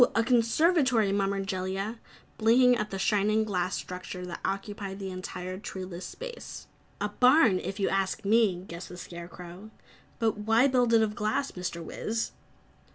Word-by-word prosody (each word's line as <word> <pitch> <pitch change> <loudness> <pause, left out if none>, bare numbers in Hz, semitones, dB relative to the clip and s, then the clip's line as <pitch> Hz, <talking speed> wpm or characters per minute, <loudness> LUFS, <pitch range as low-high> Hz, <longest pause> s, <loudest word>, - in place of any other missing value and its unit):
A 230 - +4
conservatory!" 250 - +3
murmured 195 0 0
Jellia, 195 +3 -3 0.4
blinking 245 +3 +5
at 210 -2 -2
the 195 - -4
shining 210 +2 +2
glass 185 -3 -1
structure 180 0 -6
that 175 -1 -6
occupied 195 0 -3
the 195 -1 -5
entire 185 0 -6
treeless 185 -3 -6
space. - - -8 0.3
"A 205 - -1
barn, 250 - +5
if 195 +2 -5
you 195 - +2
ask 195 +2 -1
me!" 205 -4 +3
guessed 170 +2 -8
the 180 - -9
Scarecrow. 175 +3 -9 0.5
"But 220 -3 0
why 225 +5 +4
build 245 -3 +3
it 225 - +5
of 210 -1 -1
glass, 215 +6 -1
Mr. 175 -2 -5
Wiz?" 225 +7 -3
205 Hz, 155 wpm, -28 LUFS, 185-225 Hz, 0.5 s, blinking